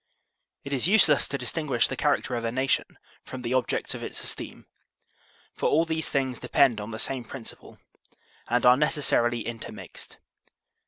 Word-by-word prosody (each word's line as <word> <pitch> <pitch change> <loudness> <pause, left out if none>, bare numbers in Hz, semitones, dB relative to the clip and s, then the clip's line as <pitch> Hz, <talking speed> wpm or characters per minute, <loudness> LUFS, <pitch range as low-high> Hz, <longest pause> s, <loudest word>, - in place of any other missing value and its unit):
It 140 - -5
is 135 +3 +2
useless 185 -8 +5
to 140 - -3
distinguish 130 -1 0
the - - -4
character 145 -4 0
of 120 - -3
a 115 - -1
nation 130 +2 -1 0.3
from 130 -1 -8
the 120 +1 -2
objects 130 -1 0
of - - -7
its - - -4
esteem, - - -5 0.9
for - - 0
all 160 +2 +3
these 160 -1 -2
things 130 -3 -1
de - - -9
pend 120 -6 +4
on 105 - -6
the 110 - -5
same 130 +2 -2
principle 125 0 -10 0.7
and 120 0 +1
are 125 +1 +7
necessarily 120 -6 +1
inter 115 -1 -6
mixed. - - -11
130 Hz, 170 wpm, -26 LUFS, 120-145 Hz, 0.9 s, are